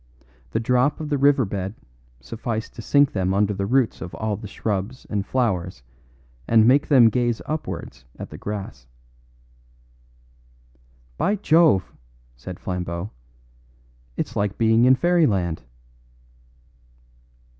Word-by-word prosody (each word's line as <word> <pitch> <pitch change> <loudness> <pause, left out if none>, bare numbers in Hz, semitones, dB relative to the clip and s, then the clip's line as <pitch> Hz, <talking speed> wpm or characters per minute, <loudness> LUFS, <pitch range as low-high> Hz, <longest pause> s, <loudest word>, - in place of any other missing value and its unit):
The 70 - -1
drop 125 +5 +1
of 155 -1 -5
the 145 - +1
river 140 -2 +4
bed 95 +1 -4 0.4
sufficed 110 - -5
to 115 - -8
sink 145 +4 +3
them 95 -1 -1
under 105 +1 +2
the 100 0 -3
roots 130 0 +1
of 90 - -7
all 110 -1 -3
shrubs 105 +5 -4
and 100 -2 0
flowers 95 - -1 0.6
and 110 -1 +5
make 140 +3 +4
them 125 -6 +6
gaze 120 -1 0
upwards 150 - -5
at - - -8
the - - -8
grass. 100 -11 -6 2.3
"By 200 +3 +2
Jove!" 160 - +3 0.4
said 90 +9 -9
Flambeau, 90 +1 -4 1.1
"it's 115 - -3
like 100 -2 -1
being 115 +1 +4
in 130 +1 +6
fairyland." 120 - +1
110 Hz, 120 wpm, -23 LUFS, 95-130 Hz, 2.3 s, them